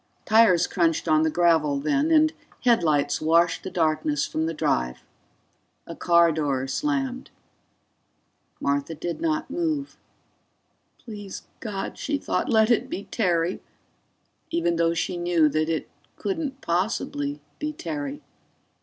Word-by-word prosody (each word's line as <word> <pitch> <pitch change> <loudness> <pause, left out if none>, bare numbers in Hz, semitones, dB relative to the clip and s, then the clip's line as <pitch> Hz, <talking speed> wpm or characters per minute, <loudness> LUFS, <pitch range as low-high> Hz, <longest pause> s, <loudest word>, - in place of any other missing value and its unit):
Tires 220 -6 +5
crunched 170 -3 0
on 155 -1 +4
the 160 - +2
gravel 160 -4 +2
then, 275 - +1
and 315 -1 +4 0.3
headlights 155 - +2
washed 165 +2 +3
the - - -6
darkness 155 -4 0
from 160 +1 -2
the 165 - -2
drive. 60 - -1 0.8
A - - -8
car 170 -1 +4
door 145 -4 -1
slammed. 270 - -2 1.3
Martha 140 +3 -1
did 170 - -5
not 315 -3 -1
move. 310 -3 -2 1.0
Please 205 -4 -9 0.2
God, 205 -3 -5
she 290 0 -1
thought, - - -2
let 220 +1 +4
it 235 - +2
be 195 - -4
Terry, 175 -4 0 0.9
even 325 - 0
though 170 0 +2
she 175 +2 -2
knew 175 -2 +3
that 155 +2 0
it 160 - -2 0.3
couldn't 305 -8 -3
possibly 170 -6 -1 0.2
be 300 0 -2
Terry. 295 -2 -5
175 Hz, 125 wpm, -25 LUFS, -, 1.3 s, Tires